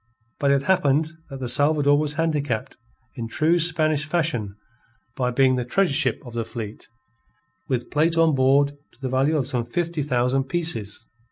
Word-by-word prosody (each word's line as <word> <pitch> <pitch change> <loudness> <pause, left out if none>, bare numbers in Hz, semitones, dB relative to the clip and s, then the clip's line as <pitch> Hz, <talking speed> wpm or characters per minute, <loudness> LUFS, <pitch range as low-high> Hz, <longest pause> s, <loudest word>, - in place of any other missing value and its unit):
But 140 - +2
it 140 0 +2
happened 155 -4 +2 0.2
that 135 -2 -8
the 130 - -4
Salvador 145 +3 +3
was 150 -1 -1
handicapped 145 -7 -1 0.4
in 115 -3 -5
true 160 +8 +2
Spanish 155 -3 +2
fashion 155 - -1 0.6
by 125 -1 0
being 130 +1 +3
the 125 - -1
treasure 175 +7 +1
ship 135 -6 +1
of 120 - -10
the 115 -1 -2
fleet, 110 -1 -8 0.8
with 125 -2 -2
plate 165 +3 +2
on 165 -1 +4
board 135 +1 +3 0.2
to - - -27
the 135 -1 -4
value 135 +5 +1
of 135 -4 -1
some 125 -4 -1
fifty 165 +6 -2
thousand 130 -1 0
pieces. 125 -9 -3
140 Hz, 170 wpm, -23 LUFS, 125-155 Hz, 0.8 s, on